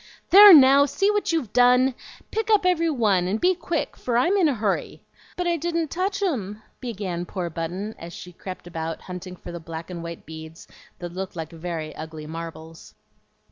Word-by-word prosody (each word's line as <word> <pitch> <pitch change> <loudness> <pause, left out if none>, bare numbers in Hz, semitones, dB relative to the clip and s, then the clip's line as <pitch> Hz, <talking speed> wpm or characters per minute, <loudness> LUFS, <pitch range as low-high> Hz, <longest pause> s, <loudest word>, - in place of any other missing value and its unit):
"There, 410 +2 +11
now 280 -2 +8
see 390 +8 +1
what 415 -3 0
you've 305 -11 -2
done! 250 +1 +5 0.4
Pick 445 0 -2
up 420 -4 +4
every 335 -2 +2
one, 210 - +1
and 205 +4 -1
be 365 +1 +3
quick, 340 -3 -3
for 240 -2 -1
I'm 345 +11 +3
in 370 -5 +4
a 285 - +1
hurry." 210 -3 -2 0.3
"But 360 - -1
I 345 -1 +1
didn't 335 -1 -2
touch 390 +3 -2
'em," 215 - -3 0.2
began 195 -8 -4
poor 175 -1 -5
Button, 180 +7 -4
as 170 +1 -8
she 180 +1 -10
crept 185 +1 -9
about 165 -2 -5
hunting 180 0 -8
for 175 - -10
the 170 - -6
black 165 +1 -8
and 170 -1 -6
white 170 0 -8
beads 160 +1 -10 0.3
that 175 -1 -7
looked 190 +1 -5
like 160 -1 -6
very 165 -2 -6
ugly 155 -1 -8
marbles. 165 0 -9
200 Hz, 190 wpm, -24 LUFS, -, 0.4 s, There